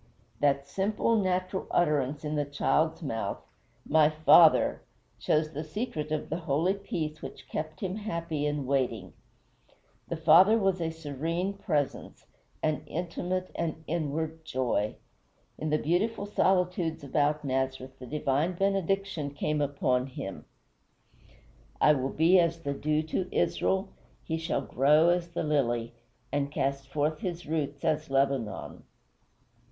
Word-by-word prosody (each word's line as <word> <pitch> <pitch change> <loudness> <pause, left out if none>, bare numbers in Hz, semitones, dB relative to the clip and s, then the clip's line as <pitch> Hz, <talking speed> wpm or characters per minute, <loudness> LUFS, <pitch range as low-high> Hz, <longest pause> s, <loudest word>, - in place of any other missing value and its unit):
That 140 -1 +2
simple, 210 +5 0
natural 185 -2 0
utterance 150 -3 +1
in 150 - -2
the 150 -1 +1
child's 155 +3 0
mouth 115 -7 -2 0.5
"My 155 -1 +5
Father" 155 +1 +5 0.4
shows 155 0 +1
the 150 +2 -4
secret 155 -3 -4
of 155 -1 -3
the 165 - -1
holy 160 +7 +2
peace 160 -6 -4
which - - -9
kept 155 0 -5
him 190 0 -2
happy 170 -8 -2
in 145 -2 -2
waiting. 125 -8 -1 0.9
The 170 - -3
Father 170 +7 +6
was 195 -4 +1
a 165 - 0
serene 165 +4 -3
presence, 150 -8 -3 0.4
an 155 -1 +1
intimate 180 +2 -3
and 160 -1 -3
inward 160 0 -3
joy. 125 -7 -1 0.6
In 155 - -2
the 150 - +3
beautiful 200 +7 0
solitudes 180 -5 +1
about 145 +2 0
Nazareth 130 0 -2
the 125 - -9
divine 150 +4 0
benediction 195 -4 0
came 150 +1 -2
down 145 -1 +1
upon 130 -2 0
him: 95 - -7 1.3
"I 150 - +6
will 135 -2 -1
be 165 +6 +4
as 165 -1 +1
the 140 - -1
dew 155 +2 0
to 180 +4 -2
Israel: 190 +1 +1 0.3
He 160 -1 -2
shall 165 - -1
grow 150 +6 +4
as 175 -1 +1
the 170 - -3
lily, 120 -6 0 0.4
And 140 0 -1
cast 135 -1 -1
forth 150 +2 -1
his 175 -1 -4
roots 145 -2 -3
as 155 -1 0
Lebanon." 135 -6 -1
155 Hz, 135 wpm, -29 LUFS, 140-175 Hz, 1.3 s, Father